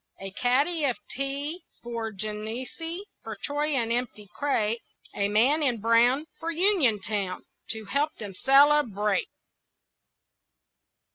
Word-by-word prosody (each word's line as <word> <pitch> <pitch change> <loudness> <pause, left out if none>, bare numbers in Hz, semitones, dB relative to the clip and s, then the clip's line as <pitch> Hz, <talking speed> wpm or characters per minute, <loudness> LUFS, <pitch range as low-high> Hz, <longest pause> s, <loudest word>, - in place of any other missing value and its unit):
A 195 0 -6
kaddy 280 - +1
of 255 -4 0
tea 280 +5 -3 0.2
For 230 -2 -4
Genessee, 225 - -5 0.2
For 220 -1 -7
Troy 290 +7 -1
an 230 -3 0
empty 235 -4 -2
crate, 230 -2 0 0.3
A 200 - +1
man 250 +9 +3
in 250 -6 +1
brown 235 +6 +3
For 330 - -4
Uniontown 220 - +1 0.2
To 220 -1 -3
help 285 +8 0
them 205 -3 -7
celebrate. 270 - +3
245 Hz, 115 wpm, -27 LUFS, 215-290 Hz, 0.3 s, man